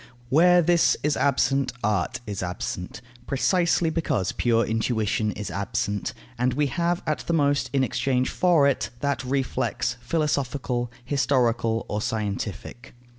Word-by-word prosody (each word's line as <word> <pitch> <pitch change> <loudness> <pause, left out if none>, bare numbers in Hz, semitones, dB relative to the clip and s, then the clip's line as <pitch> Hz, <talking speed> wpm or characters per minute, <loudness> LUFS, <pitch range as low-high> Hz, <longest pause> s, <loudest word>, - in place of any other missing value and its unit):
Where 175 +5 +5
this 170 0 +3
is 150 0 +2
absent, 135 -1 +1
art 105 -1 0
is 105 -3 -4
absent, 90 0 -5 0.3
precisely 170 +3 +2
because 140 - -1
pure 115 -1 +2
intuition 110 -1 0
is 105 -4 -6
absent, 100 +2 -2 0.2
and 125 0 +1
we 150 - +2
have 170 0 0
at 155 - -1
the 170 - 0
most, 145 -4 +2
in 135 -1 +2
exchange 130 +1 0
for 170 -6 +4
it, 140 - 0
that 140 -2 -1
reflex, 125 -2 -1
philosophical, 130 -3 -1 0.2
historical, 120 -5 +1
or 105 - -2
scientific. 110 +1 -4
130 Hz, 130 wpm, -25 LUFS, 115-145 Hz, 0.3 s, Where